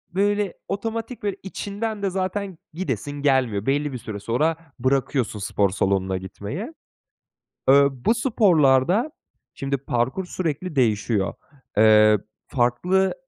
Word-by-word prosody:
böyle 205 -1 +1
otomatik 225 +4 -4
ve 200 -2 -1
içinden 205 +2 -4
de 195 - +2
zaten 190 0 -3 0.2
gidesin 145 - -3
gelmiyor. 125 -8 +2
Belli 145 +1 0
bir - - -3
süre 105 -3 -7
sonra 150 +10 +1 0.2
bırakıyorsun 130 -3 0
spor 100 0 +1
salonuna 95 0 0
gitmeyi. 105 - -6 1.0
Eee, 140 +1 +7
bu 135 - +1
sporlarda, 195 - +3 0.4
şimdi, 135 0 -2
parkur 130 +7 -1
sürekli 175 -1 -3
değişiyor. 110 -4 +1 0.4
Eee, 110 0 +6 0.3
farklı 175 +10 +1
140 Hz, 115 wpm, -23 LUFS, 115-195 Hz, 1.0 s, Eee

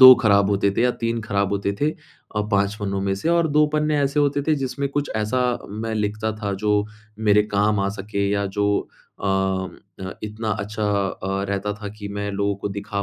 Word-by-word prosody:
2 130 0 +13
खराब 100 -3 +3
होते 100 0 +2
थे 115 - 0
या 125 - +4
3 115 0 -1
खराब 100 -2 0
होते 100 0 0
थे 150 +1 +3
अ, 105 -7 -8
5 100 0 +2
पन्नों 100 -1 -1
में 95 0 0
से। 130 +12 -2
और 170 -1 +4
2 150 0 +5
पन्ने 150 0 +2
ऐसे 140 +1 +2
होते 145 0 +2
थे 155 - +5
जिसमें 140 0 -2
कुछ 145 +1 -2
ऐसा 110 +4 0 0.3
मैं 110 +2 -3
लिखता 110 +1 -1
था 100 -1 -1
जो 105 -1 +3 0.3
मेरे 105 -1 +4
काम 105 0 +1
आ 100 - +1
सके 100 0 -1
या 100 0 +1
जो 100 - +3 0.5
अ, 95 -1 0 0.5
इतना 110 +1 -3
अच्छा 105 +1 -3 0.3
अ, 95 +1 -3
रहता 100 +1 -1
था 105 - -3
कि 100 -1 -6
मैं 100 0 -3
लोगों 100 0 0
को 100 - -3
दिखा 100 0 -3
105 Hz, 205 wpm, -23 LUFS, 100-115 Hz, 0.5 s, 2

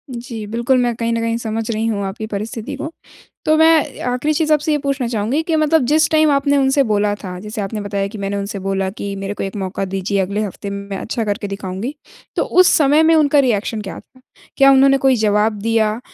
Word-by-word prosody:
जी, 235 -2 -6
बिल्कुल, 235 +4 +1
मैं 240 -1 0
कहीं 230 0 -2
न 230 - 0
कहीं 230 0 -1
समझ 225 -1 -4
रही 220 0 -1
हूँ 205 -3 -1
आपकी 195 +3 -5
परिस्थिति 220 +5 -5
को। 310 +3 -6 0.5
तो 310 - +4
मैं 320 -2 +3
आखिरी 250 +5 0
चीज़ 310 0 +2
आपसे 300 +1 +1
ये 300 - +2
पूछना 275 -3 -2
चाहूँगी 230 +6 -1
कि 325 -1 -1
मतलब 310 -1 +3
जिस 310 +4 +3
टाइम 310 -1 +4
आपने 280 0 +2
उनसे 275 +1 +3
बोला 210 -3 +1
था, 185 -3 -8
जैसे 210 +2 -6
आपने 210 +2 -4
बताया 200 -1 -2
कि, 210 +2 -9
"मैंने 200 0 -3
उनसे 200 0 -4
बोला 195 0 -1
कि 200 0 -6
मेरे 195 +1 -4
को - - -5
एक 195 +1 -5
मौका 195 0 -3
दीजिए। 195 +1 -2
अगले 200 +3 -2
हफ़्ते 200 0 -6
में, 200 0 -6
मैं 195 - -3
अच्छा 230 +2 -3
करके 205 0 -2
दिखाऊँगी।" 195 +6 -5 0.4
तो - - +1
उस 365 0 +4
समय 295 +1 +4
में 325 +1 +5
उनका 295 -2 +4
रिएक्शन 225 -4 0
क्या 195 - -7
था? 255 - -22 0.4
क्या 275 0 +7
उन्होंने 275 0 +5
कोई 265 -1 +3
जवाब 210 +1 +1
दिया 225 0 +1
225 Hz, 225 wpm, -18 LUFS, 200-275 Hz, 0.5 s, क्या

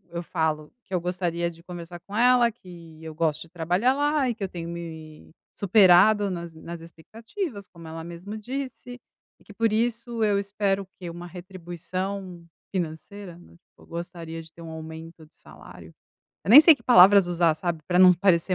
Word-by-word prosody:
eu 170 - -2
falo 155 -2 -2
que 190 - -13
eu 180 - 0
gostaria 175 -1 -2
de 165 0 -15
conversar 175 -1 -9
com 200 - -10
ela, 240 0 +4
que 170 -6 -14
eu 160 -1 -8
gosto 160 -1 -1
de 165 - -18
trabalhar 180 +9 +1
lá, 290 -2 +1
e 235 - -2
que 215 - -7
eu 195 - -1
tenho 170 -2 -7
me 160 -3 -9 0.3
superado 200 +1 +5
nas 170 -2 -6
m 160 - -14
nas 170 -1 -8
expectativas, 215 - -8
como 165 -2 -14
ela 160 0 -7
mesmo 175 +5 -8
disse. 245 +1 -7 0.4
E - - -24
que - - -15
por 225 0 0
isso, 230 0 -1
eu 205 -2 +2
espero 200 0 -1
o - - -19
que, 175 - -7
uma 175 +1 -9
retribuição 180 0 -7 0.3
financeira? 180 +1 -6
Do 175 - -18
tipo, - - -29
eu - - -18
gostaria 170 -1 -7
de 160 0 -19
ter 170 - -14
um 165 - -9
aumento 160 0 -10
de 155 - -25
salário. - - -14 0.5
Eu 160 - -9
nem 270 +6 +12
sei 320 0 +7
que - - -21
palavras 200 -4 +7
usar, 170 -2 +2
sabe, 165 -1 -4
pra 180 -1 +1
não 185 -1 +8
parecer 185 0 +2
180 Hz, 195 wpm, -25 LUFS, 165-205 Hz, 0.5 s, nem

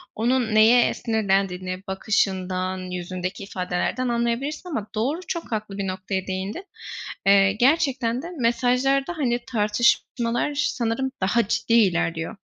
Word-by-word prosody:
onun 235 0 +1
neye 230 +3 +6
sinirlendiğini 195 -4 -1
bakışından, 190 -1 0
yüzündeki 180 +1 -4
ifadelerden 190 +6 -2
anlayabilirsin. 240 +8 -1
Ama 220 -10 -3
doğru, 265 +10 0
çok 335 -6 -4
haklı 210 -2 -3
bir 195 - -2
noktaya 190 0 -3
değindin. 190 - -4 0.6
Eee, 195 0 +6
gerçekten 255 -1 +2
de - - -7
mesajlarda 255 +6 +1
hani 245 -4 +1
tartışmalar 235 +4 +1
sanırım 265 -2 -1
daha 210 +3 +2
ciddi 230 - -1
ilerliyor. 170 -3 +2
220 Hz, 115 wpm, -24 LUFS, 190-245 Hz, 0.6 s, neye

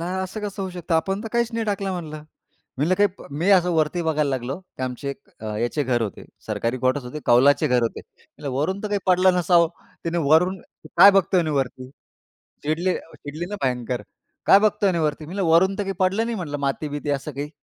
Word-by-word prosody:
असं 190 +4 -3
कसं 205 -1 -4
होऊ 190 - -4
शकतं? 175 -1 -3
आपण 195 +5 0
तर 225 - -5
काहीच 235 -1 +1
नाही 230 0 -1
टाकलं 200 -2 -2
म्हणलं. 155 -4 -6 0.5
मी 145 - +1
म्हंटलं 185 +2 +1
मी 175 - 0
असं 180 -2 +5
वरती 160 +2 +1
बघायला 155 -2 +1
लागलो 130 +2 -3
की 180 -8 -11
आमचे 130 +2 -4
एक 140 - -8 0.2
अ, - - -9
ह्याचे 120 +7 -1
घर 120 -3 0
होते. 105 - -5 0.2
सरकारी 115 +2 -2
कॉटर्स 130 +2 0
होते 125 +5 -6
कौलाचे 140 +5 +5
घर 125 -3 +2
होते. 115 - -2 0.2
म्हणल 145 - -10
वरून 175 +9 -1
तर 210 - -3
काही 205 0 0
पडलं 185 0 +4
नसावं. 170 -1 +4 0.4
तिने 170 +1 -1
वरून 160 +4 +3
म्हणे, 190 - -17
"काय 200 - +10
बघतोय 195 -1 +3
म्हणे 155 -2 -2
वरती." 130 -1 -2 0.8
चिडली 165 +5 0 0.2
चिडली 150 +4 -6
ना 205 - -3
भयंकर. 125 -1 -1 0.4
"काय 195 - +7
बघतोय 205 -1 +2
आणि 175 -2 0
वरती." 155 -1 -1
मी 165 - -9
म्हणलं, 195 0 -1
"वरून 190 +4 +4
तर 205 - -1
काही 195 0 -3
पडलं 195 +4 +2
नाही 235 0 -2
म्हंटलं 155 -7 -4
माती-बिती 145 +1 -3
असं 140 +2 -3
काही. 145 +2 -5
165 Hz, 210 wpm, -23 LUFS, 140-190 Hz, 0.8 s, काय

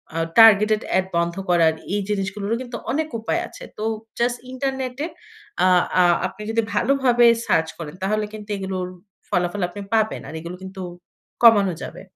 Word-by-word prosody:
আ - - -2 0.2
targeted 215 -1 +7 0.2
add 185 - +1
বন্ধ 170 0 0
করার 165 -2 +4 0.2
এই 205 - +1
জিনিসগুলোরও 200 +2 -2
কিন্তু 245 -2 -6
অনেক 310 +4 0
উপায় 220 - -1
আছে। - - -12
তো 215 - -4 0.4
জাস্ট 240 +1 +1
ইন্টারনেটে 265 +1 -3 0.6
আ - - +5 0.3
আ - - +6 0.2
আপনি 190 - -12
যদি 230 0 +2
ভালোভাবে 245 +1 +3 0.2
সার্চ 160 0 +2
করেন, 160 -1 -7
তাহলে 210 +2 0
কিন্তু 210 -1 -9
এগুলোর 190 -2 -3 0.4
ফলাফল 180 +2 0
আপনি 205 +3 -8
পাবেন। 220 -1 +1
আর - - -8
এগুলো 170 +2 -7
কিন্তু 190 0 -8 0.6
কমানো 205 -5 +6
যাবে। - - -8
210 Hz, 160 wpm, -22 LUFS, 185-235 Hz, 0.6 s, targeted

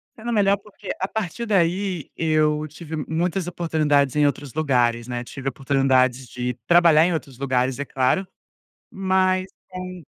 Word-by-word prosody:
Sendo 235 +2 -4
melhor, 200 -2 +3
porque 205 0 -13
a 190 - -1
partir 220 +2 -4
daí, 185 -3 0
eu 155 -1 +1
tive 160 +1 -8
muitas 170 +3 -1
oportunidades 155 -5 +1
em 150 -1 +4
outros 145 -2 -2
lugares, 125 -6 +1
né. 120 -1 -4
Tive 135 +2 -5
oportunidades 130 -1 +1
de 125 0 -4
trabalhar 170 -1 +6
em 180 - +1
outros 140 -5 -5
lugares, 130 -1 0
é 145 - -2
claro, 135 +9 0 0.6
mas 185 -1 +1 0.2
com 185 -1 -7
155 Hz, 150 wpm, -23 LUFS, 135-185 Hz, 0.6 s, trabalhar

